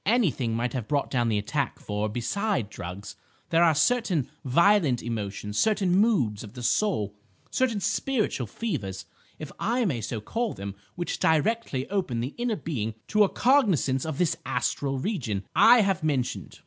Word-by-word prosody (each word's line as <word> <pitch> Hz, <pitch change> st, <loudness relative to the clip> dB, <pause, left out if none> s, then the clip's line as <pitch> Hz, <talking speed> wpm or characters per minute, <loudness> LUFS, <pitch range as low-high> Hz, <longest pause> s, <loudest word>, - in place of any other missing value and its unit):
"Anything 155 Hz, -, +2 dB
might 120 Hz, +1 st, -1 dB
have 125 Hz, -5 st, -3 dB
brought 145 Hz, -1 st, 0 dB
down 120 Hz, -3 st, +1 dB
the 110 Hz, -, +1 dB
attack, 130 Hz, +6 st, -2 dB
for, 105 Hz, +1 st, -3 dB
besides 130 Hz, -, -1 dB
drugs, 95 Hz, +3 st, -7 dB, 0.4 s
there 165 Hz, +1 st, +5 dB
are 165 Hz, -3 st, +4 dB
certain 175 Hz, -, +2 dB, 0.2 s
violent 155 Hz, -, +3 dB
emotions, 105 Hz, -2 st, -3 dB
certain 200 Hz, -5 st, +2 dB
moods 185 Hz, -, +2 dB
of 105 Hz, -, -10 dB
the 125 Hz, -, -7 dB
soul, 120 Hz, -, +1 dB, 0.4 s
certain 245 Hz, -5 st, +1 dB
spiritual 215 Hz, -, -1 dB
fevers, 100 Hz, -, -4 dB, 0.3 s
if -, -, -8 dB
I 235 Hz, +3 st, +1 dB
may 135 Hz, -, -1 dB
so 110 Hz, +1 st, -3 dB
call 225 Hz, -, -2 dB
them, 100 Hz, 0 st, -6 dB, 0.2 s
which 175 Hz, -1 st, -3 dB
directly 160 Hz, -, +1 dB
open 180 Hz, -13 st, -1 dB
the 125 Hz, +5 st, -3 dB
inner 240 Hz, -2 st, 0 dB
being 115 Hz, -, -3 dB
to 215 Hz, 0 st, +5 dB
a 200 Hz, -, +2 dB
cognisance 195 Hz, -, +2 dB
of 160 Hz, -3 st, -4 dB
this 175 Hz, -3 st, +1 dB
astral 135 Hz, +2 st, -1 dB
region 130 Hz, -, -2 dB
I 235 Hz, 0 st, +7 dB
have 195 Hz, -4 st, 0 dB
mentioned. 125 Hz, -, -2 dB
145 Hz, 160 wpm, -26 LUFS, -, 0.4 s, I